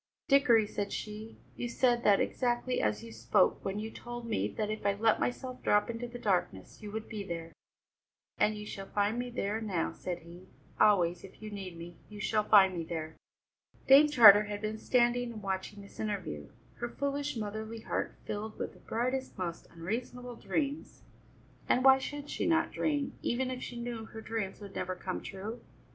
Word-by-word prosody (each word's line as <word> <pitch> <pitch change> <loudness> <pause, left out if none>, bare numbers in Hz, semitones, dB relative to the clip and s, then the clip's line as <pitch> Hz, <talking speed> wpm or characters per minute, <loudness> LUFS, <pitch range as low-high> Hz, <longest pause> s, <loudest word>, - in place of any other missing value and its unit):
"Dickory," 255 -6 +5
said 205 -1 -3
she, 215 +1 -6 0.2
"you 240 - -3
said 240 0 +2
that 200 -1 +5
exactly 245 0 0
as 105 0 0
you 115 - -9
spoke 115 - +2
when 195 +1 -2
you 220 +1 -4
told 240 0 -7
me 225 -2 0
that 215 -1 -3
if 215 - -4
I 200 0 +3
let 220 +2 +3
myself 255 0 -3
drop 205 +3 +3
into 235 +1 -5
the 240 0 -8
darkness, 180 - -1
you 210 - -7
would 220 +1 -5
be 215 -3 -5
there." 165 -3 -6 0.9
"And 215 - +3
you 210 - -7
shall 195 -2 -7
find 205 +4 0
me 245 0 -3
there 220 -2 -2
now," 190 -7 -1
said 175 -2 -5
he; 175 +2 -13 0.3
"always, 180 -4 +4
if 195 - -13
you 215 -1 -7
need 190 -4 -6
me, 170 0 -9
you 210 -1 -9
shall 215 +1 +1
find 195 -3 +6
me 170 - -2
there!" 160 -1 -5 0.7
Dame 280 +3 +8
Charter 210 -6 +9
had 205 0 -4
been 215 +1 -3
standing 245 0 +2
and 215 -2 -9
watching 195 +1 -3
this 200 - -15
interview, 185 - -3 0.3
her 240 - -3
foolish 280 +1 -2
motherly 220 +1 -4
heart - - -2
filled 215 +1 -4
with - - -4
the - - -18
brightest, 255 +3 -2
most 170 -2 -4
unreasonable 240 +8 -5
dreams. 290 +4 -3 0.7
And 255 - +3
why 265 0 +8
should 290 +2 -5
she - - -2
not 330 0 +2
dream, 290 -3 -1
even 255 +2 0
if 255 0 -5
she 240 - -6
knew 235 -2 -4
her 220 0 -9
dreams 220 -3 -4
would 200 -1 -9
never 185 0 -3
come 185 0 -4
true? 205 +5 -6
215 Hz, 190 wpm, -31 LUFS, 195-240 Hz, 0.9 s, Charter